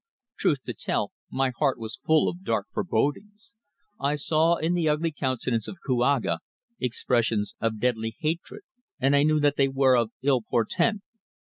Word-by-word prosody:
Truth 140 -4 +1
to - - -4
tell, - - -2 0.2
my 135 -1 0
heart 140 -4 +2
was 115 +2 -7
full 160 -1 +4
of 180 +2 -4
dark 110 - 0
forebodings. 205 - -2 0.5
I 140 +2 +1
saw 160 +3 +2
in 165 +1 0
the 170 -3 +1
ugly 155 +2 +1
countenance 130 -5 -1
of 190 - -7
Kouaga 125 - +1 0.4
expressions 115 -3 0
of 115 -1 -1
deadly 115 -2 -1
hatred, 165 - -3 0.4
and 135 +2 +3
I 140 - +5
knew 155 +1 +3
that 145 0 +2
they 135 - +4
were 135 -1 +3
of 115 -2 +2
ill 135 -3 +3
portent. 170 - 0
135 Hz, 165 wpm, -26 LUFS, 120-155 Hz, 0.5 s, I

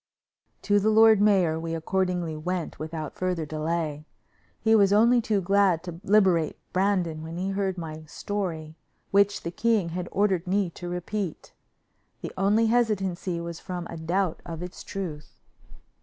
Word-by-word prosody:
To 205 0 +3
the 210 +2 +2
lord 220 -1 +6
mayor 185 -6 +3
we 165 0 -3
accordingly 180 -1 -1
went 175 +2 -4
without 155 -1 -5
further 180 -3 -2
delay. 155 0 -3 0.5
He 220 0 +3
was 200 -3 +5
only 235 +4 +5
too 215 -3 0
glad 190 -2 +3
to 175 -1 -8
liberate 190 -6 +3 0.2
Brandon 185 -5 +1
when 165 +1 -7
he 185 +2 -2
heard 195 -1 -1
my 155 -2 -7
story, 165 -3 -4 0.4
which 200 0 +3
the 170 - -3
king 215 -3 +1
had 175 +1 -4
ordered 190 -3 +1
me 190 -1 +1
to 175 +1 -7
repeat. 180 0 -4 0.7
The - - -6
only 205 +4 +3
hesitancy 195 -7 0
was 170 -1 -6
from 180 -1 -5
a - - -6
doubt 170 +2 -1
of 165 0 -6
its 180 +1 -8
truth. 165 -7 -7
180 Hz, 155 wpm, -26 LUFS, 165-200 Hz, 0.7 s, lord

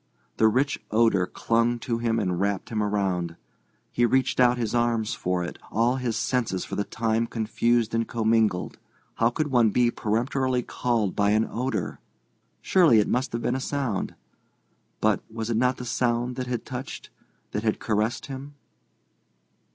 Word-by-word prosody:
The 110 - +5
rich 130 +6 +1
odour 110 -4 +3
clung 115 +3 +1
to 115 -2 -2
him 115 -1 0
and 90 -5 -1
wrapped 100 -2 -1
him 110 -2 -1
around. 95 -5 -1 0.6
He 120 - +1
reached 130 +3 +2
out 125 -1 +5
his 115 -3 -2
arms 120 -2 +1
for 90 0 -1
it, 85 - -6
all 120 +4 +2
his 120 -3 -2
senses 115 -7 -1
for - - -5
the 100 - 0
time 115 +2 -1
confused 115 +1 0
and 115 0 0
commingled. 110 -5 +1 0.4
How 115 - +4
could 150 +3 -2
one 120 -4 +4
be 120 +3 +2
peremptorily 125 +4 0
called 115 -7 -1
by 100 0 +2
an 110 +2 +3
odour? 115 -5 -3 0.6
Surely 170 -11 +5
it 105 - +3
must 130 +1 0
have 115 0 -2
been 120 - +1
a 130 - -1
sound. 135 -6 -2 0.9
But, - - +2
was 115 +1 -3
it 110 - +1
not 125 +2 +2
the 125 - -6
sound 120 +1 0
that 130 -1 -4
had 125 -2 -3
touched, 130 +1 -7 0.4
that 105 - -2
had 110 -1 0
caressed 110 +3 -1
him? 140 +1 -8
115 Hz, 165 wpm, -26 LUFS, 110-125 Hz, 0.9 s, The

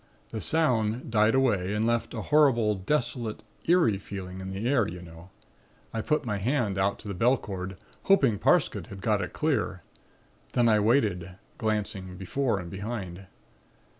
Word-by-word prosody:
The 110 - -4
sound 120 -8 +1
died 110 +1 +4
away 105 -7 +2
and 110 +1 +1
left 115 0 0
a 110 - -4
horrible, 130 -8 +4
desolate, 115 +2 -2 0.2
eerie 165 - +4
feeling 95 -2 -7
in 95 - -6
the 100 +5 -3
air, 125 -6 +3
you 90 +2 -7
know. 85 +1 -12 0.6
I 115 - -1
put 150 +3 0
my 105 -3 -2
hand 110 -3 0
out 100 +1 +1
to 110 - -11
the 100 - -3
bell 120 +8 +3
cord, 95 -3 -6 0.3
hoping 135 - +4
Parsket - - +2
had 100 - -9
got 105 0 +1
it 90 - -4
clear. 115 - -1 0.7
Then 120 -1 +3
I 110 -2 +4
waited, 105 -6 +1 0.3
glancing 100 -4 -2
before 115 +5 -1
and 85 -2 -7
behind. 95 -3 -6
105 Hz, 165 wpm, -27 LUFS, 95-120 Hz, 0.7 s, died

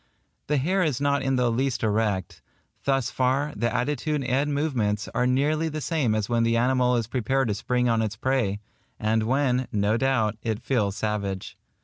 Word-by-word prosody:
The 150 - +1
hair 185 +8 +1
is 150 -7 0
not 140 0 +1
in 135 0 0
the 125 -2 +2
least 130 +1 -1
erect. 105 -7 -1 0.4
Thus 135 -2 +1
far, 135 +4 0
the 115 +2 0
attitude 145 +3 -1
and 135 +4 0
movements 120 -9 0
are 125 - +1
nearly 150 +5 +1
the 155 0 -4
same 145 -8 0
as 110 -1 -1
when 120 -1 +1
the 115 0 +2
animal 125 0 +2
is 115 -2 0
prepared 130 +2 0
to - - +1
spring 125 +4 0
on 115 -1 +2
its 105 -2 -2
prey, 110 -4 0 0.4
and 110 +1 +1
when, 130 +2 +1
no 105 +1 +1
doubt, 115 -5 +1
it 110 -2 -2
feels 105 -7 0
savage. 100 -3 -3
125 Hz, 185 wpm, -25 LUFS, 110-135 Hz, 0.4 s, the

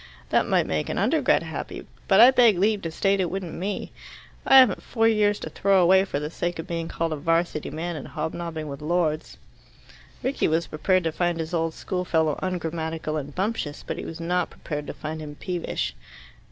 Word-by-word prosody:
"That - - +2
might - - +2
make - - -2
an - - -2
Undergrad - - +2
happy, - - -6 0.2
but 195 0 +5
I 245 +3 +10
beg 235 -7 +5
leave 205 +2 +2
to 165 - -3
state 195 +4 +1
it 180 -2 +1
wouldn't 185 -3 -4
me. 195 +3 -4 0.6
I 270 - +8
haven't 255 -7 +6
four 225 -2 +1
years 210 -2 +3
to - - -5
throw 195 -1 +3
away 190 +2 +5
for 145 - -3
the 150 +1 -4
sake 175 +1 -3
of 165 - -5
being 165 -1 -3
called 165 -1 -2
a - - -1
'Varsity 165 +1 0
man 165 +3 -4
and 145 - -7
hobnobbing 160 0 -4
with 140 -1 -7
Lords." 160 -1 -1 0.9
Rickie 270 +2 +1
was 165 +1 +1
prepared 185 +4 +1
to 165 - 0
find 175 0 -1
his 160 +2 -4
old 165 -1 0
schoolfellow 165 -4 0
ungrammatical 165 -3 -3
and 145 -1 -5
bumptious, 190 -7 -2
but - - -4
he - - -5
was 165 - -7
not 180 +1 0
prepared 150 -2 -6
to - - -5
find 155 +1 -5
him 150 -1 -8
peevish. 175 +2 -3
170 Hz, 200 wpm, -25 LUFS, 160-190 Hz, 0.9 s, I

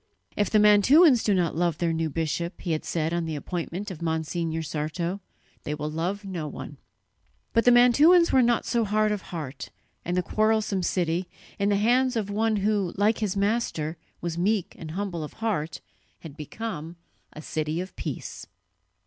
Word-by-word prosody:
"If 205 - +1
the 215 - +3
Mantuans 235 - +6
do 210 - +2
not 175 -4 0
love 170 -2 0
their 170 -1 0
new 160 0 -1
bishop," 165 +3 -3
he 175 - -3
had 155 - -1
said 160 0 -1
on 170 -1 -1
the 160 -1 -3
appointment 180 +6 -4
of 170 - -9
Monsignor 160 0 -2
Sarto, 165 +5 -3 0.4
"they 150 - -3
will 150 0 -4
love 180 +6 -3
no 175 -5 -4
one." - - -8 0.8
But 230 - +3
the 245 - +7
Mantuans 290 +9 +6
were 260 - +5
not 240 -1 +2
so 235 -1 +1
hard 215 0 +1
of 210 -2 -2
heart, 150 -7 -7 0.3
and 175 +1 -2
the 180 - +2
quarrelsome 215 0 +1
city, 175 0 -1 0.3
in 200 0 +2
the 205 - +3
hands 245 +5 +2
of 205 -3 -2
one 220 +1 +1
who, 205 -3 0
like 210 +2 +2
his 205 -3 -1
Master, 200 -7 0 0.3
was 170 0 -3
meek 200 0 0
and 160 - -7
humble 175 -1 -3
of 150 - -8
heart, 180 -9 -3 0.4
had 155 -4 -10
become 165 +1 -6 0.4
a 155 - -9
city 155 +1 -2
of 185 +1 -6
peace. - - -6
185 Hz, 180 wpm, -26 LUFS, 160-215 Hz, 0.8 s, the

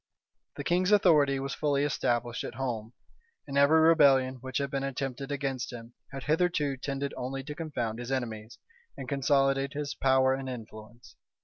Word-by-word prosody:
The - - -5
king's 180 +3 +1
authority 150 -9 +4
was 135 +1 -4
fully 145 -2 0
established 120 -4 -1
at - - -6
home; 120 -3 -4 0.5
and 140 - -6
every 140 +3 +5
rebellion 140 -5 +5
which 130 0 -4
had 140 -1 -2
been 135 - -1
attempted 135 0 -4
against 135 -3 -3
him, 120 -1 -10 0.2
had 135 -1 -7
hitherto 155 -2 +1
tended 140 +1 -4
only 135 +2 -4
to 150 +2 -6
confound 125 -8 -4
his 120 +2 -6
enemies, 115 -4 -4 0.4
and 130 - -7
consolidate 135 0 +1
his 145 0 -3
power 130 0 +3
and 135 0 -4
influence. 115 -1 -10
135 Hz, 165 wpm, -29 LUFS, 125-145 Hz, 0.5 s, every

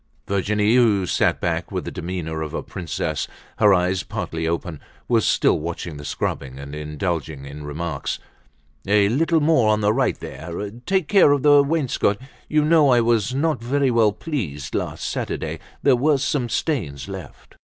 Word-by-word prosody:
Virginie, 105 +2 +1
who 105 -6 +4
sat - - +1
back - - -2
with - - -3
the - - -4
demeanor 80 -2 -4
of 75 -1 -4
a - - -3
princess, 85 -5 -3 0.3
her 105 -2 +6
eyes 90 0 +2
partly 80 0 -4
open, 85 -1 -3 0.3
was 115 -3 +2
still - - +3
watching 85 0 -5
the 70 - -9
scrubbing, 65 -2 -3
and 70 +1 -8
indulging 75 -1 -3
in 70 +2 -8
remarks. 75 0 -3 0.7
"A 100 0 +4
little 160 +6 +2
more 145 -8 +4
on 105 0 +2
the 105 +1 +3
right 130 +2 0
there. 85 +5 -6 0.2
Take 190 -5 +1
care 195 -8 +6
of 140 - 0
the 145 -1 +7
wainscot. 140 -8 +1 0.3
You 150 0 +3
know 155 -2 +5
I 125 -1 +5
was 115 +1 +1
not 150 -3 0
very 135 +2 +1
well 115 -3 +4
pleased 95 - -4
last - - -3
Saturday. - - -3 0.2
There 135 -3 +5
were 145 +4 +3
some 135 -2 -1
stains 105 - -2
left." 95 -7 -10
105 Hz, 170 wpm, -22 LUFS, 80-135 Hz, 0.7 s, the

